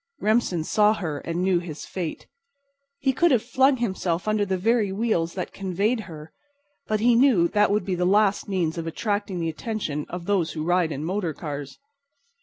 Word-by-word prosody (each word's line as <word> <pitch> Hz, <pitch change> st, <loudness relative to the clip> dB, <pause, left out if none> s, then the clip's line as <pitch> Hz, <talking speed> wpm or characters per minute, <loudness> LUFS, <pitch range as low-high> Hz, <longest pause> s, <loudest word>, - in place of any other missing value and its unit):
Remsen 210 Hz, -6 st, +1 dB
saw 210 Hz, +5 st, +3 dB
her 155 Hz, -8 st, -4 dB
and 170 Hz, +4 st, -3 dB
knew 185 Hz, -2 st, +3 dB
his 165 Hz, -3 st, -7 dB
fate. 175 Hz, -4 st, -5 dB, 0.7 s
He 270 Hz, -1 st, +1 dB
could 345 Hz, +6 st, +3 dB
have 250 Hz, -7 st, +3 dB
flung 260 Hz, +3 st, +3 dB
himself 190 Hz, -6 st, -2 dB
under 215 Hz, -1 st, +1 dB
the 190 Hz, 0 st, 0 dB
very 215 Hz, +1 st, +1 dB
wheels 190 Hz, -5 st, 0 dB
that 180 Hz, -, -4 dB
conveyed 200 Hz, +5 st, -1 dB
her, 155 Hz, -1 st, -10 dB, 0.5 s
but 215 Hz, -1 st, 0 dB
he 240 Hz, +1 st, +5 dB
knew 235 Hz, -8 st, +4 dB
that 210 Hz, 0 st, +3 dB
would 205 Hz, -2 st, +1 dB
be 190 Hz, -, -1 dB
the 180 Hz, 0 st, -1 dB
last 205 Hz, +2 st, +2 dB
means 170 Hz, -4 st, -1 dB
of 165 Hz, -, -4 dB
attracting 205 Hz, +2 st, -2 dB
the 165 Hz, -1 st, -1 dB
attention 160 Hz, -5 st, -4 dB
of 180 Hz, -1 st, -6 dB
those 185 Hz, -5 st, 0 dB
who 155 Hz, -, -4 dB
ride 175 Hz, -1 st, +2 dB
in 150 Hz, +1 st, -4 dB
motor 180 Hz, -3 st, -2 dB
cars. 145 Hz, -3 st, -6 dB
190 Hz, 190 wpm, -24 LUFS, 170-215 Hz, 0.7 s, he